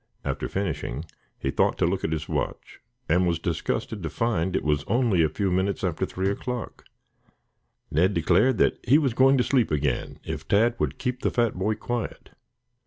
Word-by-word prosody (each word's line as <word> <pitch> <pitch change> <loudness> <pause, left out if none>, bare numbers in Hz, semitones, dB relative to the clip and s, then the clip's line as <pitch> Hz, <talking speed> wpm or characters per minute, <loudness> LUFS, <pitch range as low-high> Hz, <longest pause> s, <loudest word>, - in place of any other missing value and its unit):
After - - -2
finishing, 85 -7 -3 0.3
he 70 - -2
thought - - +2
to - - +2
look 95 +3 -1
at 80 - -1
his 80 -1 -2
watch - - -4 0.3
and 90 +3 +3
was 85 -1 +1
disgusted 85 +5 -2
to 80 - -3
find 95 -3 0
it - - 0
was 75 -1 +1
only 115 -8 +2
a 80 - +3
few 95 +5 -1
minutes 95 +2 0
after 90 +1 -1
three 95 +1 -1
o'clock. 125 +3 -5 1.1
Ned 90 +6 +2
declared 90 +9 +3
that - - +2
he 135 +5 +5
was 140 -6 +1
going 135 +2 +5
to 125 - +3
sleep 125 -4 +2
again 75 -4 -1
if - - -6
Tad 115 +4 +3
would - - -1
keep 125 0 -3
the - - +1
fat 120 -3 +1
boy 100 +4 -1
quiet. 120 +2 -4
95 Hz, 185 wpm, -26 LUFS, 85-120 Hz, 1.1 s, he